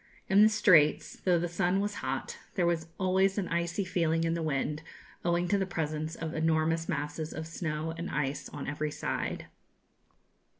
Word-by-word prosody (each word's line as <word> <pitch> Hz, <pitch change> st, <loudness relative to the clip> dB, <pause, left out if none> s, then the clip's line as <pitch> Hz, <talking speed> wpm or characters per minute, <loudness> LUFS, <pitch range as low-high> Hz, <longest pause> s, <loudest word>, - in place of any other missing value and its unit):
In 195 Hz, +2 st, +5 dB
the 215 Hz, -, +8 dB
Straits, 160 Hz, -8 st, +4 dB
though 180 Hz, -2 st, +3 dB
the 175 Hz, +1 st, 0 dB
sun 180 Hz, +2 st, +1 dB
was 205 Hz, +1 st, -1 dB
hot, -, -, -3 dB, 0.2 s
there 180 Hz, -4 st, +2 dB
was 170 Hz, -1 st, 0 dB
always 190 Hz, +1 st, +2 dB
an 195 Hz, -3 st, 0 dB
icy 170 Hz, +3 st, -1 dB
feeling 165 Hz, -3 st, +1 dB
in 165 Hz, 0 st, +1 dB
the 170 Hz, -, -2 dB
wind, 150 Hz, 0 st, -1 dB, 0.4 s
owing 175 Hz, 0 st, +1 dB
to 200 Hz, -, +3 dB
the 190 Hz, -, 0 dB
presence 155 Hz, -2 st, -3 dB
of 160 Hz, 0 st, -5 dB
enormous 160 Hz, +1 st, +1 dB
masses 150 Hz, +2 st, -3 dB
of 160 Hz, -, -4 dB
snow 160 Hz, -1 st, -3 dB
and 170 Hz, +2 st, -5 dB
ice 140 Hz, -1 st, -2 dB
on 145 Hz, -, -6 dB
every 150 Hz, +1 st, -2 dB
side. -, -, -3 dB
165 Hz, 175 wpm, -30 LUFS, 155-180 Hz, 0.4 s, the